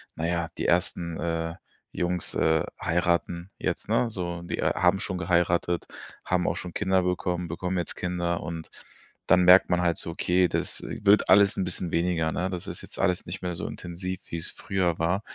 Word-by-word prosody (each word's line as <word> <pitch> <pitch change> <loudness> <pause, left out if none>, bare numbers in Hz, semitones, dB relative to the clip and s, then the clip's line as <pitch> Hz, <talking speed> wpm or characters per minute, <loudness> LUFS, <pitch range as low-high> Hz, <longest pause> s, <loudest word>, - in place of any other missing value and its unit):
na 80 - -3
ja, 85 -1 -1
die - - -2
ersten, 85 -2 0
äh, 80 -1 -2 0.4
Jungs, 90 -1 -2
äh, 80 0 +2 0.2
heiraten 85 +1 0
jetzt, - - -2
ne, 120 - +2
so 85 -4 -4
die, 85 - -4
äh, - - +1
haben 90 +2 +3
schon 95 -3 -3
geheiratet, 85 -1 +1 0.4
haben 90 -1 +1
auch - - +1
schon 90 -1 -6
Kinder 95 -2 +2
bekommen, 90 -1 -1
bekommen 90 +3 -3
jetzt 85 - -2
Kinder 85 -1 -2
und 80 -1 -6 0.6
dann 90 +1 +5
merkt 90 +1 +7
man 90 0 +2
halt 85 -1 +1
so, - - -3
okay, 90 +2 +2
das - - -2
wird 105 +1 +3
alles 100 +1 +6
'n - - +1
bisschen 90 -1 -3
weniger, 85 -2 +1
ne? 90 +2 -1
Das 90 -2 -5
ist - - -6
jetzt - - -11
alles 90 0 0
nicht 90 +3 -5
mehr 90 -1 -2
so - - -4
intensiv, 90 +2 -5
wie's 85 -1 -3
früher 90 -4 -1
war. 90 +5 +1
90 Hz, 190 wpm, -27 LUFS, 85-90 Hz, 0.6 s, merkt